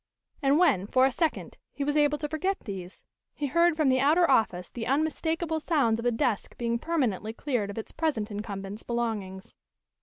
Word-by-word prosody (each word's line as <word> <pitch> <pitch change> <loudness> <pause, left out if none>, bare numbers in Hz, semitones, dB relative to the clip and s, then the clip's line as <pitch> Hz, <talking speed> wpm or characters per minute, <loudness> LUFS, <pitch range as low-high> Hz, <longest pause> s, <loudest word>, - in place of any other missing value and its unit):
And 275 +1 +3
when, 275 - +3
for 255 +4 +4
a 270 - +2
second, 320 +5 -2
he 280 - -4
was 290 +1 0
able 295 0 +3
to 295 - -3
forget 370 +6 -2
these, 190 -3 -8 0.3
he 295 - -3
heard 335 +3 +3
from 310 -3 +2
the 260 0 +3
outer 315 +6 +4
office 190 - +1
the 230 -2 -5
unmistakable 315 +3 0
sounds 275 -9 +1
of 235 - -1
a - - +3
desk 225 -2 -1
being 235 -1 -1
permanently 230 - -1
cleared 240 -5 -2
of 200 - -7
its 225 - -6
present 290 -10 -1
incumbent's 205 0 -6
belongings. 215 -6 -3
255 Hz, 185 wpm, -28 LUFS, 215-310 Hz, 0.3 s, for